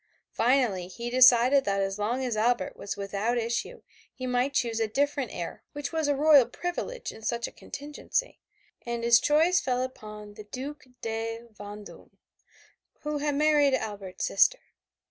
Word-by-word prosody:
Finally 230 -7 +1
he 235 +6 -6
decided 255 +2 +6
that 200 -3 0
as 195 +1 -2
long 240 +5 -1
as 240 -3 -1
Albert 235 +3 +1
was 200 - -6
without 200 +4 -1
issue 235 - -3 0.3
he 255 - -7
must 250 +2 0
choose 230 -3 0
a 225 - +1
different 280 +2 0
heir 175 - -6
which 290 -1 -4
was 320 -2 0
a 290 - +2
royal 285 -3 +6
privilege 355 - -4
in - - -13
such 235 +1 -1
a - - -10
contingency, 295 - -4 0.4
and 235 -1 -4
his 235 0 +6
choice 320 +7 +3
fell 255 -1 0
upon 210 -4 -8
the 210 - -10
Duc 270 +7 -7 0.2
de 225 0 -3
Vendome, 205 0 -11 0.8
who 300 0 -2
had 295 0 0
married 295 -2 +4
Albert's 200 -6 -4
sister. - - +4
245 Hz, 160 wpm, -28 LUFS, 215-285 Hz, 0.8 s, decided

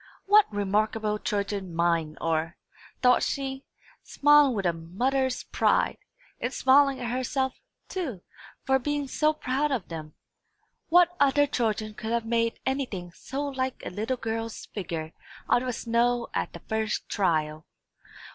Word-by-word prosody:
"What 415 - +5
remarkable 210 +1 0
children 200 -5 -2
mine 165 -2 +1
are!" 165 +1 -1 0.5
thought 250 0 +5
she, 270 -1 -3 0.4
smiling 290 -3 +4
with 195 -2 -2
a 175 - +3
mother's 245 +11 -1
pride; - - +1 0.4
and, 245 - -2
smiling 275 +1 +4
at 240 -1 -3
herself, 260 +1 -1 0.3
too, 275 - -4 0.4
for 265 0 +3
being 290 +1 -2
so 305 +4 +2
proud 295 -1 -1
of 245 -8 -2
them. 155 -2 -7 0.7
"What 355 +1 +5
other 285 +1 +4
children 220 -5 -1
could 220 +1 -6
have 235 -1 0
made 230 0 0
anything 245 -10 -2
so 270 +10 -5
like 260 -2 -3
a - - -4
little 220 +7 -2
girl's 225 -1 -4
figure 165 -5 -5 0.3
out 245 - +3
of 250 -2 -2
snow 235 +1 +1
at - - -2
the - - -9
first 220 -1 -2
trial? 155 -5 0
235 Hz, 140 wpm, -27 LUFS, 195-270 Hz, 0.7 s, What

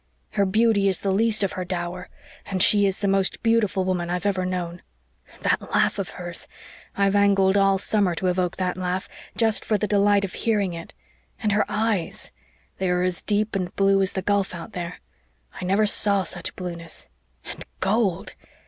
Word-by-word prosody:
"Her 200 - +1
beauty 215 0 +3
is 190 - +1
the 195 - 0
least 215 +1 +3
of 195 - 0
her 185 - -4
dower 180 0 -4 0.4
and 185 -1 +1
she 205 -1 +5
is 195 0 -2
the 200 - +1
most 195 +3 +1
beautiful 225 -5 +2
woman 180 -2 -1
I've 180 +2 -2
ever 190 -2 0
known. 175 -1 -4 0.6
That - - +1
laugh - - +2
of - - -3
hers! - - -6 0.5
I've 200 0 +2
angled 195 -1 +4
all 195 -1 +4
summer 195 -2 +1
to 185 - -3
evoke 180 -1 0
that 185 -1 -1
laugh, 185 0 -2 0.3
just 225 -2 +2
for 215 - +1
the 210 - -1
delight 205 -1 +3
of 185 - -8
hearing 205 -5 0
it. 165 0 -9 0.4
And 215 -3 0
her 210 +1 +2
eyes 210 -5 -1 0.5
they 190 -1 0
are 180 0 +1
as 180 -1 -1
deep 210 0 0
and 180 -2 -3
blue 195 0 +3
as 190 - -1
the 190 - -3
gulf 200 -2 0
out 170 - -8
there. 175 0 -6 0.6
I - - -3
never 195 +4 +3
saw 200 -1 +4
such 175 0 -5
blueness 170 -2 -7 0.4
and - - -7 0.2
gold! 195 -2 0
195 Hz, 185 wpm, -24 LUFS, 180-205 Hz, 0.6 s, she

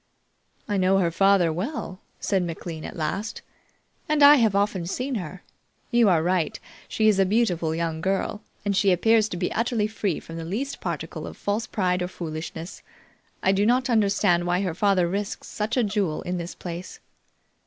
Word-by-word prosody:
"I 205 - 0
know 190 +1 +3
her 175 -3 +2
father 195 -2 +3
well," 190 - -4 0.2
said 195 -2 +1
McLean 165 -2 -5
at - - -7
last, 195 +7 -3 0.7
"and 300 -1 +3
I 290 +1 +9
have 220 -5 +3
often 200 -4 0
seen 255 +8 -3
her. 185 -4 -5 0.5
You 235 -3 +5
are 165 -3 +3
right; 175 -3 0 0.3
she 220 - +1
is 210 -2 +4
a - - +6
beautiful 185 -6 +1
young 165 -1 -2
girl, 195 +3 -1 0.2
and 200 -1 +1
she 195 0 +4
appears 220 +4 +3
to 180 - -4
be - - -2
utterly 230 -2 0
free 210 -5 -2
from 165 - -9
the 165 - -5
least 230 +12 -4
particle - - -4
of - - -9
false 210 +3 -2
pride 180 -3 0
or 180 - -1
foolishness. 165 0 -6 0.6
I 190 - +4
do 195 +1 +2
not 245 +3 +2
understand 200 -5 +2
why 175 +1 +1
her 185 -4 -1
father 185 -1 +2
risks 200 +3 -4
such 220 +4 -3
a 250 - +4
jewel 200 -7 -1
in 180 0 -3
this 170 +1 -6
place." 175 0 -7
195 Hz, 185 wpm, -25 LUFS, 175-215 Hz, 0.7 s, I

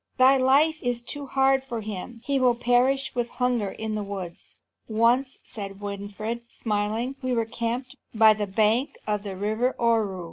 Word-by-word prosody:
Thy 260 +1 +7
life 280 +5 +3
is 245 -1 -1
too 285 +3 -6
hard 270 0 +3
for 235 -4 -5
him. 215 +3 -7
He 280 -1 +1
will 250 -2 +4
perish 245 +3 +2
with 240 -1 -1
hunger 245 -6 0
in 220 +2 -5
the 215 - -2
woods." 195 -4 -7 0.3
"Once," 240 +4 +2
said 195 -2 -6
Winfried, 205 +3 -5
smiling, 220 +4 -2
"we 255 -1 -1
were 230 -2 +1
camped 240 +4 -3 0.2
by 220 -1 +6
the 210 -1 -3
bank 220 +6 +1
of 210 -1 -1
the 200 -2 -6
river 220 +6 0
Ohru. 225 -5 +1
235 Hz, 170 wpm, -26 LUFS, 210-255 Hz, 0.3 s, Thy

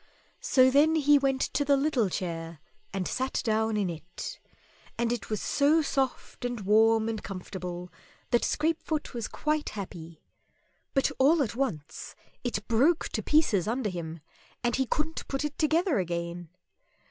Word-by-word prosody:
So 260 -1 +4
then 300 +4 +5
he 295 -2 +5
went 270 -1 +1
to 290 - 0
the 280 0 +3
little 270 -7 +1
chair 165 -3 -4 0.3
and 190 -2 -2
sat 260 +1 -1
down 220 -1 +1
in 200 -2 +1
it, 170 +1 -7 0.6
and 235 0 +1
it 240 - -5
was 215 -2 -1
so 300 +3 +3
soft 270 -3 -2
and 245 -3 -3
warm 220 +2 +4
and 225 -2 -3
comfortable 180 -2 -6 0.4
that 240 - +4
Scrapefoot 315 -1 -1
was 235 -3 -3
quite 305 0 -1
happy; 170 -5 -8 0.7
but 270 - +3
all 290 +3 +5
at 230 - -4
once 225 - -4 0.3
it 225 -4 -3
broke 275 +9 +3
to - - -2
pieces 300 - +2
under 230 -2 -1
him 165 -2 -6 0.4
and 240 -1 +1
he 265 -1 +1
couldn't 315 +4 -2
put 275 +2 -2
it 295 -1 -4
together 315 - +2
again! 170 -1 -3
235 Hz, 155 wpm, -28 LUFS, 185-285 Hz, 0.7 s, then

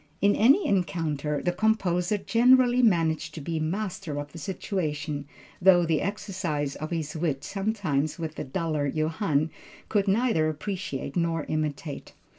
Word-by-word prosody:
In 200 0 +4
any 275 - +5
encounter, 155 -5 -1
the 175 - +2
composer 190 -1 +1
generally 245 +3 +4
managed 165 -8 +2
to - - -5
be 160 +2 -2
master 175 -2 -3
of 145 0 -6
the 165 - -9
situation, 150 -4 -3 0.4
through 180 -2 +6
the 160 -2 +1
exercise 180 -8 -2
of 155 - -5
his 160 -3 -3
wit, 155 -4 -1
something 195 -8 -1
which 160 -2 -4
the - - -5
duller 155 -1 -1
Johann 155 0 0 0.4
could 205 -2 +1
neither 195 -6 +2
appreciate 155 -4 -4
nor 165 -2 0
imitate. 155 -1 -3
165 Hz, 140 wpm, -27 LUFS, 150-200 Hz, 0.4 s, through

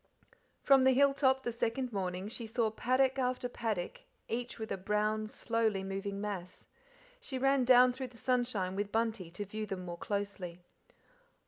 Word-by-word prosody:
From 270 -2 +6
the 260 0 +6
hill 280 +1 +5
top 265 -1 +2
the 240 - -1
second 235 +2 -2
morning 185 -1 -2
she 230 +1 -4
saw 225 0 0
paddock 255 +4 +2
after 250 -1 0
paddock, 220 -7 -3 0.3
each 240 +1 -3
with 220 -1 -6
a - - +1
brown, 210 +2 0
slowly 220 -3 0
moving 195 +1 -4
mass; 195 -3 -5 0.5
she 285 - -5
ran 270 0 +3
down 250 0 +7
through 260 +1 -5
the 240 -1 -16
sunshine 235 -7 0
with 205 +1 -2
Bunty 220 -5 -1
to 175 +5 -6
view 215 +2 -5
them 185 -2 -5
more 175 -1 -6
closely. 200 -4 -3
220 Hz, 165 wpm, -33 LUFS, 200-255 Hz, 0.5 s, down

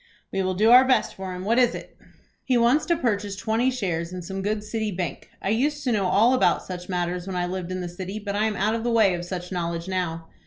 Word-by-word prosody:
"We 195 - -1
will 185 0 -1
do 215 +5 +4
our 250 +1 +9
best 260 -1 +2
for 190 -1 -6
him. 180 +1 -6
What 230 +4 +3
is 245 -2 +3
it?" - - -9 0.5
"He 255 -2 +2
wants 240 +6 +3
to 340 - +3
purchase 205 -8 -1
twenty 220 +5 +1
shares 180 -9 -2
in 180 -1 -6
some 195 +2 -5
good 210 +1 -1
city 220 0 -2
bank. 175 -5 -4
I - - 0
used 285 +7 0
to 255 - 0
know 200 -4 +1
all 225 +7 +4
about 255 - +2
such 180 -1 -7
matters 180 0 -2
when 190 - -4
I 180 0 0
lived 185 0 -4
in 185 0 -3
the 180 - -4
city, 185 +3 -6
but 205 -1 -4
I 210 +1 +2
am 215 -1 -1
out 210 +3 +1
of 225 0 -2
the 240 - 0
way 220 -5 +4
of 175 0 -4
such 180 0 -6
knowledge 170 -1 -3
now." 170 -3 -3
195 Hz, 265 wpm, -25 LUFS, 180-225 Hz, 0.5 s, our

